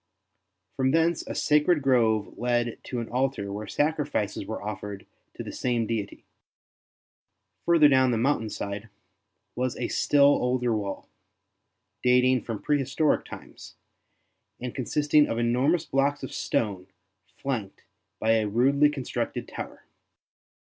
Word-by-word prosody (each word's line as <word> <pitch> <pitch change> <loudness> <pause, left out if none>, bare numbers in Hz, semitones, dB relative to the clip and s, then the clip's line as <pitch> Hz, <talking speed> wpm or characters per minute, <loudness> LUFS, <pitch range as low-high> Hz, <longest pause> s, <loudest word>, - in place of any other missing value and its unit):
From 130 0 +2
thence 165 +3 +2
a - - -5
sacred 150 +1 +3
grove 115 -6 +2
led 120 -1 -1
to 125 -2 -3
an 115 - -7
altar 125 -6 -1
where 105 +1 -5
sacrifices 145 -10 -1
were 110 - -4
offered 105 -1 -6 0.3
to - - -6
the - - -7
same 120 -2 -1
deity. 105 -3 -4 1.4
Further 165 -3 +6
down 130 -2 +4
the 120 - +1
mountain 115 -2 +1
side 100 +2 -5 0.7
was 125 +1 -2
a - - -2
still 145 -1 +3
older 125 -4 +3
wall, 100 -2 -4 0.9
dating 125 0 +4
from 115 -3 -6
prehistoric 150 +1 +1
times, - - -11 0.8
and 125 -1 -5
consisting 145 +3 +2
of 115 - -2
enormous 130 +8 +2
blocks 140 +1 0
of - - -6
stone 95 -5 -2 0.5
flanked 115 -8 -4 0.4
by 110 - +2
a 110 -1 0
rudely 135 +7 +3
constructed 140 -4 -4
tower. - - -8
125 Hz, 125 wpm, -26 LUFS, 110-145 Hz, 1.4 s, Further